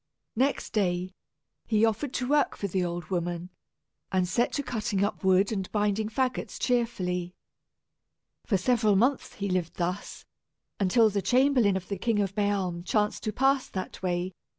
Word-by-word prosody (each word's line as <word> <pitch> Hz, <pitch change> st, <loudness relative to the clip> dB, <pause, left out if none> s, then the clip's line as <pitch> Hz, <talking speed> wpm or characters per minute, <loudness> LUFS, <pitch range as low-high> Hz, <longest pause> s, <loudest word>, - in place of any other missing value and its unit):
Next 270 Hz, +5 st, 0 dB
day, 185 Hz, -3 st, 0 dB, 0.5 s
he 220 Hz, 0 st, +4 dB
offered 225 Hz, +5 st, -1 dB
to 250 Hz, -, -1 dB
work 290 Hz, 0 st, +2 dB
for -, -, -4 dB
the 185 Hz, 0 st, 0 dB
old 175 Hz, -1 st, -4 dB
woman, 175 Hz, 0 st, -2 dB, 0.6 s
and 185 Hz, -1 st, +1 dB
set 235 Hz, +7 st, +1 dB
to 285 Hz, -, -1 dB
cutting 215 Hz, -6 st, -1 dB
up 205 Hz, -, -2 dB
wood 190 Hz, +2 st, +4 dB
and 195 Hz, -4 st, -3 dB
binding 210 Hz, 0 st, 0 dB
fagots 255 Hz, +3 st, -2 dB
cheerfully. 185 Hz, -8 st, -1 dB, 1.1 s
For 200 Hz, -, +1 dB
several 215 Hz, +1 st, +2 dB
months 250 Hz, +7 st, +1 dB
he 200 Hz, -, -3 dB
lived 180 Hz, -3 st, -1 dB
thus, 180 Hz, +3 st, -4 dB, 0.5 s
until 215 Hz, +3 st, +4 dB
the 200 Hz, 0 st, 0 dB
chamberlain 250 Hz, -5 st, +3 dB
of 185 Hz, -1 st, -7 dB
the 200 Hz, -2 st, -4 dB
King 230 Hz, +1 st, +1 dB
of 200 Hz, -1 st, 0 dB
Bealm 195 Hz, -4 st, -1 dB
chanced 210 Hz, +2 st, 0 dB
to 215 Hz, -, 0 dB
pass 270 Hz, +4 st, +2 dB
that 185 Hz, -1 st, -6 dB
way. 180 Hz, 0 st, -1 dB
200 Hz, 160 wpm, -28 LUFS, 185-230 Hz, 1.1 s, he